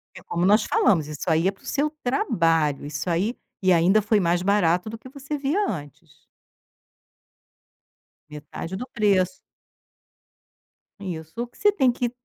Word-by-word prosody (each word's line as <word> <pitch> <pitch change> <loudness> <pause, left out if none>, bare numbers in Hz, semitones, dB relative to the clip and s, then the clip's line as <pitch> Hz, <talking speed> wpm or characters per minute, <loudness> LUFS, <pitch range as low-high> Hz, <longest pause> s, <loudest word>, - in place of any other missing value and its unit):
É 175 - -12
como 175 +1 -1
nós 210 +2 +5
falamos 155 -6 +2
isso 150 +3 -5
aí 165 +2 +3
é - - +2
para 195 - -24
o - - -17
seu 295 +2 0
trabalho, 165 - +1
isso 145 +4 -4
aí 190 +8 0 0.3
e 185 -1 +3
ainda 180 +6 +4
foi 215 +1 +2
mais 175 -1 +1
barato 185 -1 +2
do 225 - -7
que 255 - -13
você 280 +2 -5
via 295 +9 0
antes. 150 -1 -9 2.1
Metade 150 +5 -7
do 250 - -6
preço. 200 +1 +2 1.7
Isso, 160 -5 -6
o 240 - -3
que - - -24
você 415 - +4
tem 270 -11 +2
que 240 -1 -2
190 Hz, 155 wpm, -24 LUFS, 165-235 Hz, 2.1 s, nós